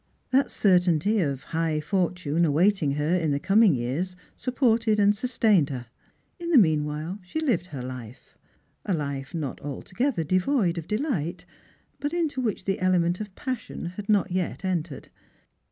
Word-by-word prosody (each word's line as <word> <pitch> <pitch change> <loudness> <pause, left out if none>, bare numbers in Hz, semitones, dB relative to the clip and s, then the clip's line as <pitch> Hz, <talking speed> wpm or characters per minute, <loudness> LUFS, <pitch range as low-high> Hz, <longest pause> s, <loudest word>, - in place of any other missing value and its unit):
That 270 +2 +3
certainty 180 +1 +3
of 140 -6 -1
high 160 -1 -1
fortune 175 -1 0
awaiting 165 0 +3
her 150 +3 0
in 165 -4 0
the 140 0 +1
coming 195 +1 +4
years 140 +10 -2 0.2
supported 230 -4 +1
and 205 0 +4
sustained 215 - +2
her. 125 -3 -5 0.5
In 340 0 -4
the 325 - +5
meanwhile 155 -1 +1
she 180 - -4
lived 230 - 0
her 140 -7 -6
life 125 -2 -9 0.3
— - - -42
a 190 - +2
life 140 0 -4
not 150 -5 -4
altogether 185 - -2
devoid 185 - +1
of 160 - -9
delight, 210 - -2 0.5
but 290 +2 -2
into 315 -6 -1
which 215 -6 -2
the 195 -1 -1
element 180 -1 +2
of 205 -3 -7
passion 255 -8 -5
had 200 +2 -8
not 205 -4 +3
yet 185 +1 -2
entered. 170 -5 -3
180 Hz, 155 wpm, -26 LUFS, 150-215 Hz, 0.5 s, the